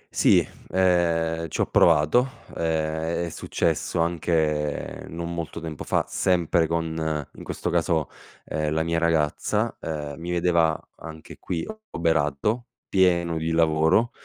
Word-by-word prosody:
Sì, - - +4 0.2
ehm, 85 -3 +2
ci - - -5
ho - - +3
provato. 85 - +3
Ehm, 80 +1 -1
è - - -4
successo - - -1
anche 80 -3 0
non 85 +1 -5
molto 85 -2 -5
tempo 80 -3 -6
fa - - 0
sempre 85 -2 +2
con, 80 -2 -2
in - - -11
questo 90 - -3
caso, 85 -3 +1 0.4
ehm, 75 -1 -2
la 80 +1 +1
mia 85 0 0
ragazza: 80 -3 +1
ehm, 75 -2 -5
mi 85 +1 -6
vedeva 85 -2 +2 0.2
anche 80 -1 -10
qui 85 -2 -3 0.2
oberato, 80 - 0 0.2
pieno 85 -3 +2
di 80 +1 -2
lavoro 80 +7 +3
80 Hz, 130 wpm, -25 LUFS, 80-85 Hz, 0.4 s, Sì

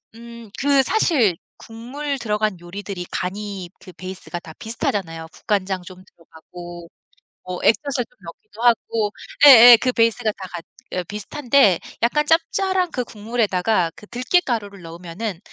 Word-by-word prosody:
음 235 -1 -12
그 280 -1 +4
사실 260 - +2 0.2
국물 270 +6 -6
들어간 210 -3 -1
요리들이 180 +1 -7
간이 195 -1 -4
그 185 - -13
베이스가 185 -1 -8
다 160 -1 -12
비슷하잖아요. 180 -7 -3
국간장 190 -2 -2
좀 185 0 -13
들어가고 175 +1 -13 0.6
뭐 180 -1 -5
액젓을 255 0 +1
좀 250 - -33
넣기도 205 +6 -12
하고 225 -3 +2 0.3
예예. 245 -3 +11
그 255 - +1
베이스가 230 -1 +2
다 190 -1 -9
같 170 -1 -6 0.3
어 180 - -1
비슷한데 210 - +2 0.2
약간 300 +6 +2
짭짤한 360 +2 +1
그 250 - -2
국물에다가 210 -5 0
그 210 - -14
들깻가루를 235 - -1
넣으면은 175 +3 -6
210 Hz, 310 characters per minute, -21 LUFS, 180-245 Hz, 0.6 s, 예예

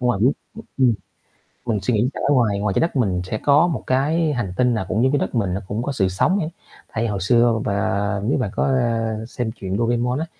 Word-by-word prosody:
không 125 -1 +2
ai 100 - -2
biết, 130 +6 +4 0.5
ừm. 125 -4 +4 0.7
Mình 110 -4 0
suy 125 - 0
nghĩ 110 +4 +2
sẽ - - -6
ở 145 - +5
ngoài 110 -6 +2
ngoài 100 -1 0
Trái - - +1
Đất 165 -1 0
mình 95 -9 +1
sẽ 110 +4 -3
có 145 +7 +4
một 160 - -3
cái 150 +4 +1
hành 100 -8 -3
tinh 125 -1 +3
nào 110 -4 -2
cũng 110 - +1
như 130 - +4
cái 145 - +3
đất - - -3
mình 100 -6 0
nó 100 - -3
cũng 110 +4 -3
có 140 - -2
sự 95 -8 +1
sống 185 - +1
hết. 160 -3 -2 0.4
Tại 115 - -1
vì - - +1
hồi 100 -3 -2
xưa 120 +3 +4
v 110 - -1
và 100 0 0
nếu 120 +6 +1
mà 105 -6 -1
có, - - +1
a, 115 -4 0
xem 120 -2 -3
truyện 95 -4 -4
Doremon 120 +3 0
á 160 - -2
115 Hz, 265 wpm, -21 LUFS, 100-130 Hz, 0.7 s, ở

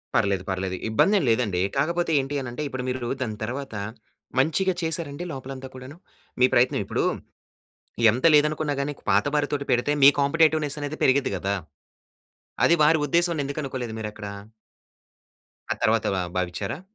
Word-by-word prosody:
పర్లేదు, 100 -2 +1
పర్లేదు. 95 0 -2
ఇబ్బంది 195 - +3
ఏం - - -2
లేదండి. 105 -7 +1 0.2
కాకపోతే 170 +3 0
ఏంటి 135 +2 -3
అనంటే, 125 +3 -6
ఇప్పుడు 130 -2 -5
మీరు 125 -2 -3
దాని 110 -4 -3
తర్వాత 130 +1 -5 0.6
మంచిగా 185 +6 +2
చేసారండి 160 -1 -3
లోపలంతా 135 0 -7
కూడాను. 130 +5 -10 0.4
మీ 125 - +7
ప్రయత్నం 125 +1 +3
ఇప్పుడూ, - - -1 1.1
ఎంత 125 +7 -2
లేదనుకున్నా 150 0 +2
గాని 140 +1 -1
నీకు 140 - -13
పాతవారితోటి 145 +6 +1
పెడితే 120 +4 +2
మీ 140 - +11
కాంపిటీటివ్నెస్ 155 0 +2
అనేది 145 +2 -4
పెరిగిద్ది 130 -5 +3
గదా! 100 +2 -1 1.1
అది 170 - +5
వారి 160 +1 +5
ఉద్దేశం 170 +1 +1
ఎందుకు 140 +2 -4
అనుకోలేదు 125 -4 -4
మీరు 105 -1 -4
అక్కడ... 105 -1 -8 1.5
ఆ - - -11
తర్వాత 110 0 +2
ఆహ్, 90 -1 -3
భావించారా? 90 - -3
135 Hz, 145 wpm, -25 LUFS, 115-150 Hz, 1.5 s, మీ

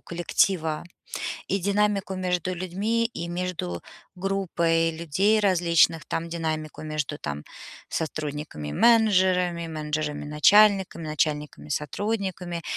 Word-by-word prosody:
коллектива, 170 -2 0 0.6
и 195 - +1
динамику 200 0 +1
между 180 -1 -1
людьми, 195 +6 -1
и 170 -7 -6
между 175 - -3 0.4
группой 170 -3 +1
людей 170 +7 +1
различных, 170 -5 +3
там 165 +1 -3
динамику 160 -2 -4
между, 155 -2 -3
там, 75 +1 -5 0.4
сотрудниками-менеджерами, 170 - +1
менеджерами-начальниками, 155 +5 +2
начальниками-сотрудниками. 160 - -2
170 Hz, 80 wpm, -25 LUFS, 155-190 Hz, 0.6 s, различных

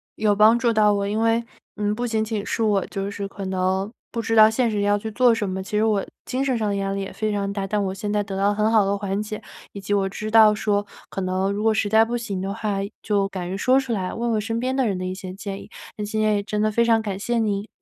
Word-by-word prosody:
有 210 -1 +2
帮 215 +3 +6
助 235 -2 +1
到 210 -1 +4
我。 200 0 -1
因 210 +2 -1
为， 230 +1 +2 0.3
嗯， 210 0 0
不 240 +3 -2
仅 220 -1 0
仅 215 -2 -3
是 225 - -2
我 205 -3 +2
就 195 0 -4
是 200 -1 -4
可 195 0 -7
能 190 +2 -1 0.2
不 230 - -2
知 225 - 0
道 215 0 +8
现 230 0 +1
实 205 - -1
要 205 0 +2
去 220 +1 -5
做 245 0 +4
什 210 -3 -2
么， 190 0 -3
其 210 +2 -3
实 215 - +3
我 210 -3 +1 0.2
精 260 +1 -1
神 260 -3 0
上 220 -2 -1
的 200 - -1
压 195 0 -1
力 195 - -2
也 195 - -6
非 215 -1 -2
常 200 -1 -1
大， 195 -1 -3
但 205 0 0
我 190 - -2
现 205 +1 -4
在 210 -1 +1
得 195 -1 -6
到 195 +1 +1
了 205 - +1
很 215 +1 +2
好 215 -3 +4
的 200 +1 0
缓 200 0 -2
解。 215 0 -5 0.3
以 200 - -6
及 200 +1 -3
我 195 -1 +1
知 215 +2 -5
道 215 -1 +7
说， 205 -1 0 0.3
可 195 - -4
能 185 +1 0
如 205 - -3
果 220 0 +3
实 215 -1 +1
在 220 +2 +5
不 235 +2 -2
行 200 -6 -4
的 195 +1 -3
话， 210 -3 -2 0.2
就 200 -2 +1
敢 185 -3 -5
于 - - -2
说 255 +7 +3
出 260 -3 -3
来， 185 -4 -2
问 235 0 -2
问 215 -1 +1
身 225 +2 -2
边 255 +2 -1
的 265 -3 +2
人 195 -3 -1
的 185 - -4
一 185 - -3
些 185 -1 -7
建 195 +1 -6
议， - - -13 0.3
那 210 - -3
今 215 +1 -3
天 215 0 +3
也 205 - 0
真 210 0 -3
的 215 0 +2
非 235 +2 +3
常 230 -1 +4
感 195 -3 -4
谢 240 +3 -1
您。 205 -2 0
210 Hz, 325 characters per minute, -23 LUFS, 195-220 Hz, 0.3 s, 道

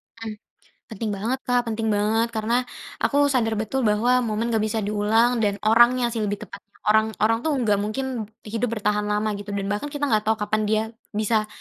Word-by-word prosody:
Mmm. 225 -2 -6 0.6
Penting 220 +1 -3
banget, 230 +7 -1
Kak 245 -1 +2
penting 225 -1 -2
banget, 215 +2 +1
karena 220 +2 0 0.5
aku 285 - +1 0.2
sadar 225 -4 +1
betul 220 +5 -1
bahwa 235 +2 +3
momen 230 0 -1
enggak 220 - +2
bisa 220 +1 -2
diulang 220 +4 +2
dan 205 -2 +1
orangnya 240 +2 +4
sih 225 - -2
lebih 205 -1 -2
tepatnya. - - -13
Orang, 220 +1 +3
orang 225 +1 +3
tuh 310 - +2
nggak 210 -3 +2
mungkin 230 +2 -3 0.2
hidup 225 +2 -2
bertahan 210 -1 0
lama 210 +1 0
gitu 205 0 -6
dan 200 0 -2
bahkan 205 +7 -2
kita 290 0 -6
nggak 215 -7 +1
tahu 220 - +4
kapan 215 0 -1
dia 215 +1 +2 0.3
bisa 215 0 +1
220 Hz, 190 wpm, -24 LUFS, 210-235 Hz, 0.6 s, orangnya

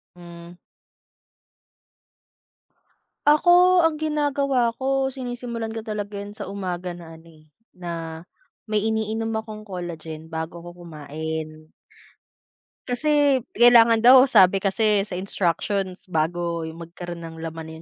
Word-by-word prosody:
Hmm. 170 0 -12 2.7
Ako 355 +4 +5
ang 325 -1 +2
ginagawa 285 -5 0
ko 270 0 0
sinisimulan 245 -3 -5
ko 225 - -5
talaga 210 -2 -5
yun 205 +1 -10
sa 205 - -5
umaga 180 -2 -5
na 165 -2 -11
ano 160 - -19 0.2
eh, 155 - -27 0.2
na 165 -2 -6 0.5
may 215 0 0
iniinom 220 0 -1
akong 215 -1 -10
collagen 165 -4 -7
bago 160 +1 -5
ako 175 0 -12
kumain. 155 0 -7 1.2
Kasi 285 +1 +2 0.2
kailangan 235 -1 +7
daw, 260 +1 +8
sabi 190 -2 +5
kasi 205 +1 +2
sa 180 - -4
instructions 190 0 -2
bago 170 0 -1
magkaroon 170 +1 -8
ng 160 0 -9
laman 160 0 -7
195 Hz, 110 wpm, -23 LUFS, 170-240 Hz, 2.7 s, daw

